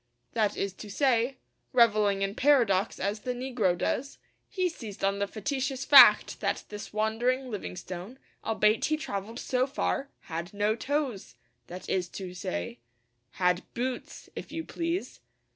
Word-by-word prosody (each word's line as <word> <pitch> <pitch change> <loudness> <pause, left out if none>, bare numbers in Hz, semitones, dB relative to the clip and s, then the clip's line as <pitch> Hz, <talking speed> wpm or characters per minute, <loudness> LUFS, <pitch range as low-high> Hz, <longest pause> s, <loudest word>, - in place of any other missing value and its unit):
That 215 -3 +1
is 195 -1 -2
to 210 - -8
say, 250 +2 +2 0.4
revelling 210 -5 +4
in 195 0 -1
paradox 230 -7 +3
as 200 +3 -1
the 250 +3 -3
negro 245 -8 0
does, 275 +9 -2 0.3
he 370 -3 0
seized 225 - -8
on 195 0 +1
the 200 - 0
facetious 270 +4 -2
fact 280 -3 +8
that - - -1
this 210 0 -7
wandering 240 +5 0
Livingstone, 185 +2 -6 0.3
albeit 215 0 +2
he 310 - +1
travelled 220 -5 -5
so 255 0 0
far, 275 0 -1
had 170 +3 -6
no 210 +1 +2
toes 260 - -2 0.3
that 180 +1 -8
is 180 -2 0
to 185 -2 -6
say, 95 - -4 0.5
had 180 -1 +2
boots, 250 +1 -4
if - - -7
you 325 - -4
please!' 335 +3 -3
220 Hz, 145 wpm, -29 LUFS, 195-260 Hz, 0.5 s, fact